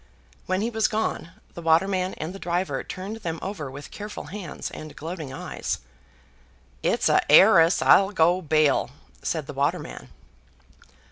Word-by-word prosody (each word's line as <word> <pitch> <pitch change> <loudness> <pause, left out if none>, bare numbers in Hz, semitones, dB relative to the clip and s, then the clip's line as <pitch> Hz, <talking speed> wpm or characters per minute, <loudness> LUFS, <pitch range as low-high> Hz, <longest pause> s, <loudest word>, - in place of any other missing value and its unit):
When 185 +1 0
he 230 +2 -1
was 220 -1 +2
gone, 215 -6 -2 0.2
the 170 - -8
waterman 185 +3 +2
and 160 +4 -5
the 195 - -9
driver 175 +1 -2
turned 195 +4 -6
them 165 -7 -4
over 185 -8 -5
with 140 +2 -10
careful 210 0 -7
hands 195 -6 -6
and 155 -1 -9
gloating 160 -3 -6
eyes. 135 - -4 1.0
"It's - - +1
a - - +4
'eiress, 170 0 +7
I'll 195 0 +6
go 180 -1 +3
bail," 155 -3 +2 0.3
said - - -2
the - - -8
waterman. 65 - -2
175 Hz, 145 wpm, -25 LUFS, 160-195 Hz, 1.0 s, eiress